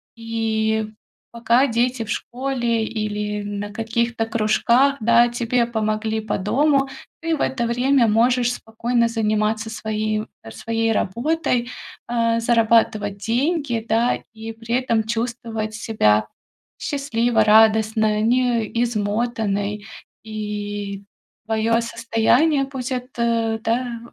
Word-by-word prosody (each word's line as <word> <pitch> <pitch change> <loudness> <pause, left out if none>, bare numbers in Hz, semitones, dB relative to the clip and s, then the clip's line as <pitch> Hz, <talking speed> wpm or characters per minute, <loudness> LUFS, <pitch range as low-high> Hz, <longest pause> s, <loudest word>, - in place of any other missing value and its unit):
И 220 -1 -1 0.4
пока 235 +3 +2
дети 240 0 0
в - - -13
школе 240 -1 -1
или 210 -1 -3
на 205 0 -5
каких-то 230 +1 -1
кружках, 230 +5 +2
да, 235 +2 +5
тебе 240 0 0
помогли 220 -1 -1
по 215 -1 -2
дому. 275 +7 +2 0.3
Ты 330 -1 0
в - - -5
это 240 -3 0
время 245 +1 +3
можешь 245 +3 +2
спокойно 235 +1 -1
заниматься 215 -1 0
своей, 215 -1 -2 0.2
э, 110 - -10
своей 225 - -1
работой. 240 - 0 0.4
Э, 230 -1 +1
зарабатывать 225 -3 +2
деньги, 240 - -1
да, 230 +3 +2
и 225 0 -7
при 230 +1 -3
этом 235 -3 +1
чувствовать 225 -1 -3
себя 110 - +2 0.5
счастливо, 240 -5 +1
радостно, 220 0 +4
не 240 0 +2 0.2
измотанной. 210 -2 -1 0.4
И 205 -2 -5 0.4
твое 225 +1 +1
состояние, 230 +6 +2
пусть 265 -2 -6
это, 235 -3 -1
да, 235 +1 -1
230 Hz, 110 wpm, -21 LUFS, 215-240 Hz, 0.5 s, да